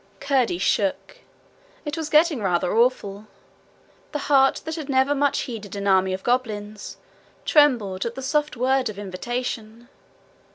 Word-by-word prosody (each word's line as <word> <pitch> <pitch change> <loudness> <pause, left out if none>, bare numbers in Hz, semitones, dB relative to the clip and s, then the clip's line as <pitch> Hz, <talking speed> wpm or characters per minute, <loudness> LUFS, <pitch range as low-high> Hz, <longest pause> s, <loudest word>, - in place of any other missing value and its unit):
Curdie 265 -9 +1
shook. 200 - -1 0.7
It 295 -1 -3
was 320 -2 -4
getting 305 -4 +3
rather 180 -1 0
awful. 215 -4 +1 0.9
The - - 0 0.2
heart 270 -1 +4
that 320 - -4
had 310 -3 -6
never 265 +1 +3
much 285 0 +1
heeded 215 -5 -7
an 200 0 -4
army 190 -1 +3
of 190 0 -4
goblins 215 -4 -2 0.5
trembled 235 -11 +3
at 235 - -6
the 265 - -6
soft 295 0 0
word 260 0 +1
of 210 - -8
invitation. 225 +3 -5
240 Hz, 140 wpm, -23 LUFS, 205-275 Hz, 0.9 s, heart